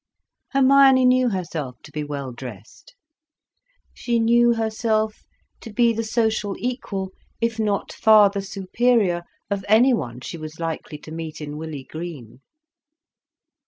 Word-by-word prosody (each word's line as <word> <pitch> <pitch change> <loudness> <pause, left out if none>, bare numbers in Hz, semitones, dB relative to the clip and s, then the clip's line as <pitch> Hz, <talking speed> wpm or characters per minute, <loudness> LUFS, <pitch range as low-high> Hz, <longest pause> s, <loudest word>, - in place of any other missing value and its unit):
Hermione 270 -1 +6
knew 250 0 +4
herself 165 - -4
to - - -13
be 150 - -4
well 140 -3 -5
dressed; 120 -4 -11 1.0
she 235 -1 -1
knew 235 +1 +4
herself 220 -1 -1 0.4
to 225 - -10
be 235 +1 +3
the 225 +1 -2
social 220 -2 0
equal, 205 -6 -4 0.3
if 230 -1 -1
not 210 -2 -1
far 215 -2 +6
the 200 -1 -3
superior, 195 -1 +1 0.3
of 200 -1 -1
anyone 215 - +3
she 170 - -7
was 155 +1 -8
likely 165 -2 -4
to 155 - -12
meet 160 -1 -6
in 150 -1 -6
Willey 155 -3 -6
Green. 155 -7 -8
200 Hz, 130 wpm, -23 LUFS, 155-230 Hz, 1.0 s, Hermione